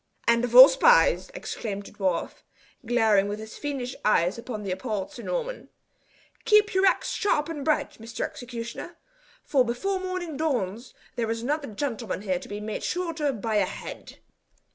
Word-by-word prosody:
"And 235 0 +4
of 245 -1 -2
all 260 +2 +13
spies!" - - +4
exclaimed 205 - -5
the - - -11
dwarf, 185 -4 -2 0.4
glaring 220 -4 +3
with 205 +1 -3
his 220 0 -9
fiendish 270 -4 -4
eyes 180 -3 +3
upon 225 -3 -6
the 195 - -3
appalled 195 0 -3
Sir 265 -5 -9
Norman. - - -4 0.7
"Keep 425 0 +4
your 380 +1 +4
axe - - +1
sharp 300 -8 +1
and 300 -4 -5
bright, 305 -5 0
Mr. 230 0 -7
Executioner, 235 -1 -7 0.5
for 270 -3 +3
before 375 +12 -2
morning 370 -5 -4
dawns 240 -7 -2 0.2
there 230 -2 -1
is 225 0 -2
another 290 +2 -1
gentleman 230 -3 -4
here 185 -3 -1
to - - -12
be 205 0 -5
made 210 0 -5
shorter 330 -5 -1
by 220 -2 -2
a 200 - +3
head." - - -9
245 Hz, 165 wpm, -26 LUFS, 215-310 Hz, 0.7 s, all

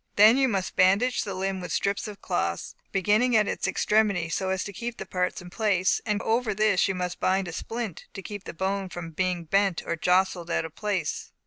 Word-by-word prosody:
Then 215 +3 +8
you 270 0 +3
must 195 -6 -2
bandage 200 +7 +3
the 200 -3 -5
limb 190 0 -2
with 180 -3 -6
strips 200 +5 0
of 205 -1 -10
cloth, - - -2 0.2
beginning 210 +6 +2
at 210 -1 +3
its - - -1
extremity, 205 -6 +2
so 190 +3 -1
as 190 -1 0
to 200 - -7
keep 235 +4 -5
the - - -6
parts 180 0 -2
in 180 - -11
place; 195 -4 +1
and 210 -1 +1
over 225 -2 +1
this 210 -3 +3
you 195 - -1
must 180 -1 -3
bind 190 0 +1
a - - -5
splint, 225 -1 -5
to 195 - -6
keep 205 0 -7
the - - -6
bone 190 +1 -1
from 170 -2 -7
being 180 +1 -1
bent 195 +1 +1
or 170 - -1
jostled 180 0 +1
out 165 - 0
of 160 - -8
place. 195 -5 -3
195 Hz, 220 wpm, -26 LUFS, 180-210 Hz, 0.2 s, Then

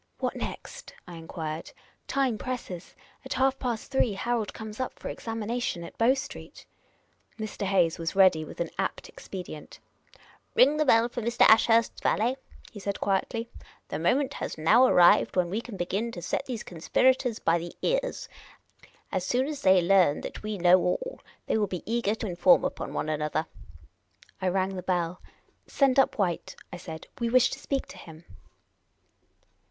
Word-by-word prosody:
" - - -43
What - - -2
next? - - -7
" - - -41
I 175 - -9
enquired. 160 -1 -6 0.2
" - - -42
Time 255 -6 +1
presses. 210 -9 -6 0.3
At - - -4
half 265 0 +1
past 240 0 -3
three 255 -5 +2
Harold 225 +2 -1
comes 220 0 -9
up 255 - -3
for - - -6
examination 225 -4 -3
at 170 - -10
Bow 240 +4 +4
Street." 280 +1 -8 0.7
Mr.. 215 -2 -4
Hayes 175 -4 +2
was 165 +2 -3
ready 185 -5 +5
with - - -11
an 170 - -2
apt 195 - -3
expedient. 180 -5 -9 0.4
" - - -28
Ring 285 +4 +5
the 305 - +2
bell 230 -3 +5
for 240 0 -5
Mr. 235 +1 +3
Ashurst's 225 +1 +4
valet," 235 +5 +1 0.4
he 210 - -9
said, 200 0 -3
quietly. 225 +4 -1 0.2
" - - -28
The 150 - -3
mo 170 +8 +3
ment 280 0 -1
has - - -5
now 220 +12 +5
arrived 175 -7 +5
when 180 -2 +1
we 215 +4 -1
can 235 -4 -9
begin 195 +6 -2
to 175 - -7
set 275 - -2
these 240 -4 -4
con 170 - -10
spirators 255 +5 +2
by 170 -4 +1
the 170 +1 -8
ears. - - -1 0.8
As 185 - -1
soon 250 +7 +1
as 290 -1 -5
they 185 -2 +5
learn 180 -5 +4
that - - -7
we 215 -1 -4
know 180 +1 +6
all, - - -2 0.3
they 220 - +1
will 205 - +1
be 180 -2 -5
eager 225 -2 0
to 225 - -5
inform 200 +9 +4
upon 275 - -4
one - - -3
another." 155 +1 -1 1.0
I 190 - 0
raifg 190 +1 0
the 185 - -5
bell. 175 -1 -1 0.2
" - - -40
Send 275 -1 +3
up 270 - +3
White," 180 -5 -1 0.2
I - - -5
said. 160 -2 -8
" - - -20
We 235 -1 0
wish 250 +1 +4
to 270 - -5
speak 275 -2 -2
to - - -11
him." 160 0 -13
210 Hz, 190 wpm, -27 LUFS, 175-245 Hz, 1.0 s, know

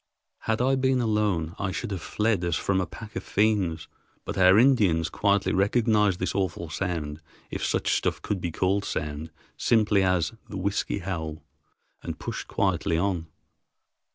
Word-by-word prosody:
Had 110 +2 0
I 135 +1 +3
been 130 -1 +2
alone, 105 -8 0
I 95 -1 -1
should 95 - -4
have 95 -4 -3
fled 105 +1 0
as 85 -2 0
from 95 +2 +1
a 90 - -2
pack 110 +6 -10
of - - -3
fiends, 100 -6 +1 0.4
but - - -4
our 95 +1 +6
Indians 105 -11 +4
quietly 100 -1 +2
recognized 105 -1 +3
this 90 - -1
awful 85 -4 -2
sound, 80 -4 -3 0.3
if - - -4
such - - +1
stuff - - 0
could 100 -3 -3
be 85 - -1
called 95 +4 +1
sound, 75 -1 -4 0.3
simply 105 -3 +3
as 90 -1 +1 0.2
the 100 - -5
"whiskey 100 +2 -1
howl" 80 -5 -4 0.6
and - - -5
pushed - - -5
quietly 80 - 0
on. 90 -2 -1
95 Hz, 160 wpm, -26 LUFS, 85-105 Hz, 0.6 s, our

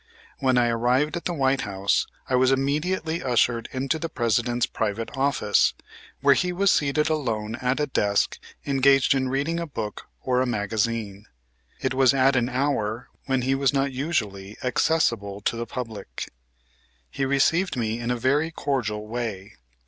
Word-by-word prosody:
When 130 -2 +2
I 120 -1 +4
arrived 125 +7 +1
at 170 - -5
the 175 - -1
White 135 -2 +2
House 100 -1 0 0.2
I - - -3
was 130 +1 +4
immediately 160 +5 0
ushered 120 -3 +1
into 135 +4 -1
the 165 - -3
President's 120 +1 +1
private 110 +2 -3
office, 135 -7 +2 0.5
where 140 0 +6
he 180 +6 0
was 195 +2 +3
seated 150 +1 +2
alone 115 -9 -1
at 125 +2 -1
a 150 - +2
desk 100 -7 0 0.3
engaged 135 -1 +4
in 130 -1 0
reading 145 +6 -1
a 170 - -3
book 110 -7 -6 0.2
or 125 -1 +1
a 130 - 0
magazine. 105 -1 -2 0.5
It 130 -1 0
was 130 0 +4
at 135 0 +4
an 120 -1 +1
hour 125 -4 -1 0.2
when 130 -2 +1
he 135 +2 +1
was 135 0 +2
not 135 0 +1
usually 110 - -3
accessible 120 -7 +1
to 110 - 0
the 115 0 -4
public. 110 -5 -6 0.8
He 135 - -3
received 140 +5 +2
me 115 -1 -1
in 120 0 -3
a 125 - 0
very 145 +7 +1
cordial 120 -9 -2
way. 110 -4 -5
130 Hz, 165 wpm, -25 LUFS, 115-140 Hz, 0.8 s, where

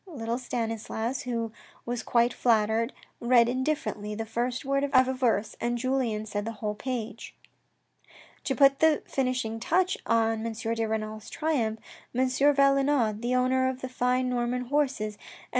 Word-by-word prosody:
Little 235 -7 -3
Stanislas, 225 0 -3
who 230 -2 -2 0.3
was 240 0 -2
quite 235 0 +2
flattered, 225 +1 +2 0.3
read 235 -1 +5
indifferently 250 -5 -2
the 225 +1 -4
first 245 +4 -2
word 275 +1 +1
of 260 -2 +4
a 260 - 0
verse, 230 -5 0
and 240 0 0
Julien 240 -4 -1
said 205 -1 -3
the 225 +2 -4
whole 210 -1 -3
page. 230 -1 -5 1.1
To 270 - 0
put 275 -1 +5
the 315 -2 +4
finishing 255 -4 -1
touch 370 +9 +1
on 225 -1 +2
M. 230 0 -3
de 225 0 -2
Renal's 215 0 -4
triumph, 260 -9 -1 0.4
M. 260 +1 +3
Valenod, 275 -4 +3
the 245 +1 0
owner 260 +1 +2
of 260 0 -5
the 260 - -4
fine 250 0 +1
Norman 250 0 -1
horses, 265 -6 0
and 210 - -21
M. - - -16
240 Hz, 160 wpm, -28 LUFS, 225-260 Hz, 1.1 s, read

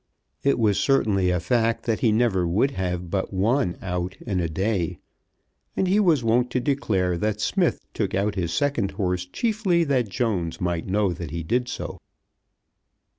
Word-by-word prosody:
It 140 - +2
was 105 -4 +2
certainly 100 -9 +2
a 90 0 +1
fact 115 +5 +1
that 115 -2 0
he 115 - +3
never 105 -6 +2
would 105 +11 +2
have 90 -5 -3
but 95 -1 -1
one 100 +1 +1
out 90 0 -3
in 95 -6 -1
a 85 -2 -1
day, 90 0 -1 0.8
and 190 - +2
he 195 +3 +3
was 165 - +3
wont 120 +2 +2
to 130 - +2
declare 105 -10 0
that 105 +1 -1
Smith - - +1
took - - -1
out 100 +2 +1
his 85 -4 -2
second 135 -7 0
horse 90 -3 -1
chiefly 205 - +1
that 130 -8 +1
Jones 95 -8 -1
might 85 -2 -2
know 100 -1 +1
that 85 -2 -6
he 85 +2 -4
did 120 +8 0
so. - - -5
100 Hz, 175 wpm, -24 LUFS, 90-125 Hz, 0.8 s, he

